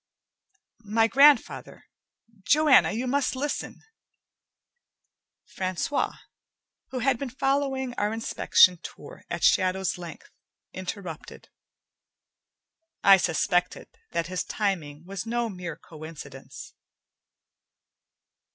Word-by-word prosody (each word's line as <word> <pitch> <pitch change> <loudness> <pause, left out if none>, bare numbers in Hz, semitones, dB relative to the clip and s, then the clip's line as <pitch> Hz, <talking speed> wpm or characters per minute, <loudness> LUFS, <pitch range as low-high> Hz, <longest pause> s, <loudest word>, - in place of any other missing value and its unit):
"My 225 +1 +3
grandfather. 275 +2 +3 0.6
Joanna, 295 +7 +4
you 235 +4 -3
must 270 +1 0
listen 285 +2 -4 0.8
" 485 - -57
Francois, 185 +9 -2 0.7
who 260 - -5
had 255 -1 +1
been 275 - -4
following 270 0 -1
our 205 +1 0
inspection 200 -5 +3
tour - - -11
at - - -4
shadow's 185 -1 +2
length, 170 -3 -10 0.4
interrupted. 185 -3 -8 1.5
I 195 -1 +8
suspected 175 +1 0 0.2
that 170 0 -2
his 180 +1 -3
timing 165 -7 -3
was 195 +4 -6
no 235 0 -1
mere 180 -5 -6
coincidence. 160 -1 -11
200 Hz, 90 wpm, -26 LUFS, 180-260 Hz, 1.5 s, I